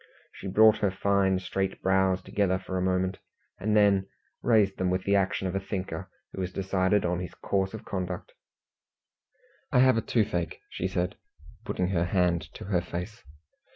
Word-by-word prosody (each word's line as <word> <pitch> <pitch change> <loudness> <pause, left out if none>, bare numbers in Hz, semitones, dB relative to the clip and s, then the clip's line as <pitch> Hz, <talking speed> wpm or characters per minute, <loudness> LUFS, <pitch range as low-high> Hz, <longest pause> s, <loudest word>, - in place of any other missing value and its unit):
She - - -8
brought 110 +3 +6
her 100 - +2
fine 95 0 +2
straight 95 +1 -2
brows 95 -1 +2
together 95 -2 +1
for 95 - -6
a 90 - 0
moment, 95 0 0 0.4
and 105 +2 +1
then 100 -2 +4 0.3
raised 105 -5 +3
them 95 -1 +1
with 90 0 0
the 100 - +2
action 95 -1 +1
of 90 - -3
a 95 - 0
thinker 95 -4 -5 0.2
who 95 - -4
has 90 0 -3
decided 95 +1 +1
on 90 0 0
his 90 -2 -6
course 95 +1 -1
of 110 - -9
conduct. 90 -2 -4 1.4
"I - - +3
have 130 -1 +6
a - - +2
toothache," 100 -8 -1
said 90 -1 -1
she, 75 0 -23
putting 90 0 -1
her 85 -3 +1
hand 90 -2 +1
to - - -8
her 95 -3 +1
face. 90 +6 -6
95 Hz, 175 wpm, -28 LUFS, 90-100 Hz, 1.4 s, brought